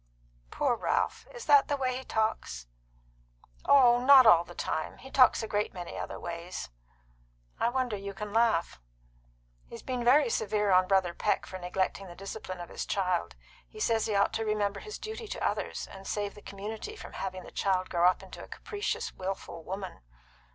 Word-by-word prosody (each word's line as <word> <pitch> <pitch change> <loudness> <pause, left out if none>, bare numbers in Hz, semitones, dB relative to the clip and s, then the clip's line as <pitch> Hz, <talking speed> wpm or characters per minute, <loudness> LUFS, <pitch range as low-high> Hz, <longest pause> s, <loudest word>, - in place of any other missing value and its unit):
"Poor 240 - +1
Ralph! - - -1
Is 485 -1 -9
that 285 -2 +6
the 285 - 0
way 255 -2 -1
he 260 - -7
talks?" 220 - -2 1.0
"Oh, 245 -3 +6
not 265 -1 +9
all 175 -6 +7
the 175 0 -13
time. 155 - -3
He 265 - -12
talks 255 -3 +5
a - - -3
great 205 -1 -1
many 175 -1 -6
other - - -5
ways." 170 - -6 0.9
"I 235 - +2
wonder 250 -3 -1
you 200 0 -6
can 210 -1 -6
laugh." 225 - +2 0.9
"He's 230 - -10
been 250 -2 -2
very 255 +1 +5
severe 210 -2 +1
on 185 0 +5
Brother 190 -3 +2
Peck - - 0
for 185 - -8
neglecting 185 +2 -2
the 175 - -10
discipline 195 -1 -7
of 175 - -7
his - - -5
child. 185 - -1 0.3
He 215 - -13
says 225 0 +1
he 215 - -1
ought 200 0 +3
to 225 - -1
remember 210 -2 0
his 425 0 -7
duty 440 +1 -6
to - - -1
others, - - -3
and 195 0 -10
save 205 -1 -2
the 205 - -13
community 215 - -7
from - - -10
having 185 -1 -5
the - - -12
child 185 -2 0
grow 175 0 +5
up 185 - -2
into - - -10
a - - -10
capricious, 425 +2 -4
wilful 185 -3 -5
woman. 190 +1 -6
205 Hz, 185 wpm, -30 LUFS, 185-245 Hz, 1.0 s, not